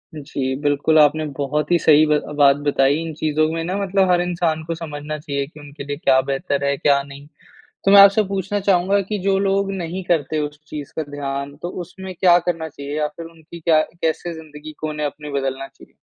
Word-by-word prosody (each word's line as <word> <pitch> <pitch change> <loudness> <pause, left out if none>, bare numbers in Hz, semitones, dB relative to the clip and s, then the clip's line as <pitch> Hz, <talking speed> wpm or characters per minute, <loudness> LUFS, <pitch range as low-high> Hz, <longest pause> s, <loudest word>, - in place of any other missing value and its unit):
जी, 135 -3 -3
बिल्कुल, 145 +2 +2
आपने 155 +1 +4
बहुत 150 +3 -1
ही 175 - +5
सही 155 0 +6
ब 150 -1 +3 0.2
बात 140 -1 +6
बताई। 140 0 +3
इन 165 -1 -5
चीज़ों 155 0 0
में 165 0 -2
ना 180 +3 -3
मतलब 195 -1 +1
हर 175 0 +3
इंसान 170 -3 -1
को 165 +1 -3
समझना 155 -2 -6
चाहिए 140 -2 -3
कि 155 0 -15
उनके 145 0 -10
लिए 145 0 -5
क्या 135 -3 +3
बेहतर 140 +1 -1
है, 140 0 +1
क्या 140 0 +3
नहीं। 140 +1 -12 0.6
तो 195 - +4
मैं 200 - +10
आपसे 200 +2 +7
पूछना 195 +1 -2
चाहूँगा 195 +1 +2
कि 205 +2 -4
जो 195 0 +2
लोग 195 0 0
नहीं 180 0 -4
करते 155 -3 0
उस 150 0 -20
चीज़ 145 -2 -7
का 160 - -1
ध्यान, 140 0 -5
तो 175 +4 -6
उसमें 185 +2 -8
क्या 175 -1 +5
करना 165 -2 -3
चाहिए 145 0 -7
या 150 -1 0
फिर 165 - -7
उनकी 165 0 -13
क्या 160 -1 +4
कैसे 170 +1 -2
ज़िंदगी 155 -1 -10
को 155 - -2
उन्हें 150 -1 -2
अपनी 150 0 -7
बदलना 135 -1 -3
चाहिए? - - -20
155 Hz, 215 wpm, -20 LUFS, 145-175 Hz, 0.6 s, मैं